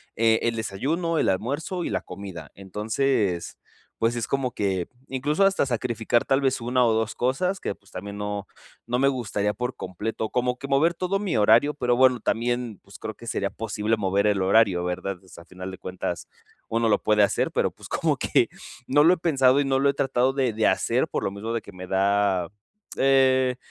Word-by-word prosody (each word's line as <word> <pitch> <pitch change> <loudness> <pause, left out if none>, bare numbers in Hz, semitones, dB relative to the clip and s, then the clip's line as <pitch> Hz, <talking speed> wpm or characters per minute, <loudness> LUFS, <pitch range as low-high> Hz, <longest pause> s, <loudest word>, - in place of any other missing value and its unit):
eh, 115 0 +3
el 115 0 0
desayuno, 150 - -1
el - - +2
almuerzo 145 - -2
y - - -2
la 95 -2 -1
comida. 95 -5 -9
Entonces, 105 -1 -1 0.4
pues 115 +1 +1
es 120 -2 -2
como 135 -2 -1
que 95 -5 -1 0.2
incluso 145 +8 0
hasta 195 -6 +2
sacrificar 120 -2 0
tal 135 -1 +2
vez 135 -2 0
una, 125 +2 +2
o 115 - +3
dos 110 0 0
cosas 180 +10 0
que, - - -3
pues, 100 - -24
también 100 +2 -7
no 105 -1 -4 0.4
no 125 - 0
me 135 +2 +3
gustaría 105 -6 -1
por 125 +2 -4
completo, 105 +4 -4
como 125 0 0
que 140 - -7
mover 150 +5 +3
todo 185 +3 -1
mi 195 - -1
horario, 115 +8 +4
pero 125 -4 +1
bueno, 130 -1 +4
también, 120 -2 -1
pues 100 0 -13
creo, 110 - -6
que 115 - -13
sería 100 -3 -1
posible 110 0 -1
mover 100 0 +1
el 100 -2 +2
horario, 95 -2 +3
¿verdad? 90 +2 -3
Pues 95 -2 -17
al 85 - -12
final 90 +1 -8
de 95 - -8
cuentas, 90 -2 -5 0.4
uno 115 0 +1
lo 105 - +2
puede 105 -1 +3
hacer, 100 - +1
pero, - - +1
pues, - - -13
como - - 0
que - - +2 0.4
no 145 +2 +4
lo 170 +3 +6
he - - -1
pensado 140 -5 +3
y 145 - +1
no 135 -1 +2
lo 140 +1 +3
he 140 - +2
tratado 130 -1 +1
de 130 -4 0
de 110 0 0
hacer. - - +1
Por - - -3
lo - - 0
mismo 110 +3 -5
de 115 - -1
que - - -13
me 90 0 -8
da, 95 -1 +1 0.5
eh, 130 -1 +3
115 Hz, 210 wpm, -25 LUFS, 100-135 Hz, 0.5 s, lo